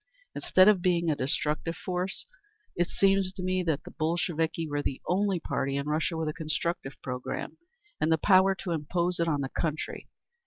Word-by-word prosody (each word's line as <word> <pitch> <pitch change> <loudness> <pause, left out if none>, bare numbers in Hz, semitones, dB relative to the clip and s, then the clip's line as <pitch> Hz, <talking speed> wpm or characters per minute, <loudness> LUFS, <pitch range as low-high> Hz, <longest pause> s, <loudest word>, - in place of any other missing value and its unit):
Instead 185 +1 +4
of 205 -4 +5
being 170 -2 +2
a - - +1
destructive 150 +5 -1
force, 180 +2 -3 0.5
it 175 0 +1
seems 195 -1 +2
to 190 -1 -7
me 185 0 +1
that 160 -5 -1
the - - -10
Bolsheviki 165 0 -1
were 145 -1 -1
the 135 -2 -3
only 195 0 +1
party 135 -3 -2
in 140 - -2
Russia 155 +2 0
with 160 -1 -1
a 155 - -1
constructive 160 -2 -3
program 125 -1 -4 0.4
and 155 - +2
the 160 - +5
power 190 +2 +5
to 180 -1 -5
impose 170 +3 -1
it 170 - +2
on 145 -3 +1
the 135 - -2
country. 155 0 -3
165 Hz, 185 wpm, -29 LUFS, 150-185 Hz, 0.5 s, of